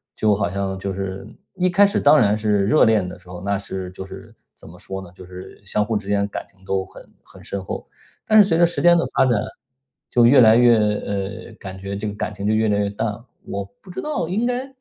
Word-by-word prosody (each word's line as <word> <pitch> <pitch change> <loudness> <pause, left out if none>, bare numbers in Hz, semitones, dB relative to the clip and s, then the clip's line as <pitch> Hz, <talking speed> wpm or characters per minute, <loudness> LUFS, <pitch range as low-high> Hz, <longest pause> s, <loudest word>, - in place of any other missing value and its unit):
就 110 -1 +2
好 100 -2 0
像 95 0 -3
就 95 0 -4
是 95 +1 -5 0.3
一 185 0 +1
开 195 +3 +5
始 200 - -1
当 145 +2 +6
然 105 -1 +3
是 105 -2 +1
热 155 - +5
恋 105 -5 +2
的 90 - -8
时 90 0 -19
候， 90 -1 -8
那 100 0 0
是 95 -2 -6
就 95 +1 -8
是 95 +3 -12 0.2
怎 - - -15
么 90 - -14
说 95 0 -6
呢， 90 - -11
就 90 - -13
是 90 +1 -11
相 105 +2 0
互 110 0 -1
之 100 -1 -8
间 100 0 +1
感 - - -6
情 95 -1 -25
都 95 -1 -1
很 - - -15
很 - - -16
深 100 -1 -5
厚。 - - -6 0.4
但 215 -1 +7
是 200 - +3
随 165 -4 +2
着 170 - +6
时 170 - -2
间 175 0 +6
的 170 - +1
发 - - +5
展， 120 -5 +2 0.7
就 120 -1 +4
越 130 +1 +7
来 110 -1 +7
越 120 -1 +6
呃， 100 -2 -2
感 95 -1 -8
觉 100 +1 -5
这 105 +1 -4
个 105 - -4
感 105 - -3
情 100 0 -6
就 110 - +2
越 110 0 +2
来 100 - +2
越 100 - 0
淡 105 +3 -3
了。 105 +3 -6 0.2
我 100 0 -4 0.2
不 190 - -17
知 180 - -5
道 300 - -3
应 220 +6 0
该 250 +2 -2
105 Hz, 280 characters per minute, -21 LUFS, 95-120 Hz, 0.7 s, 但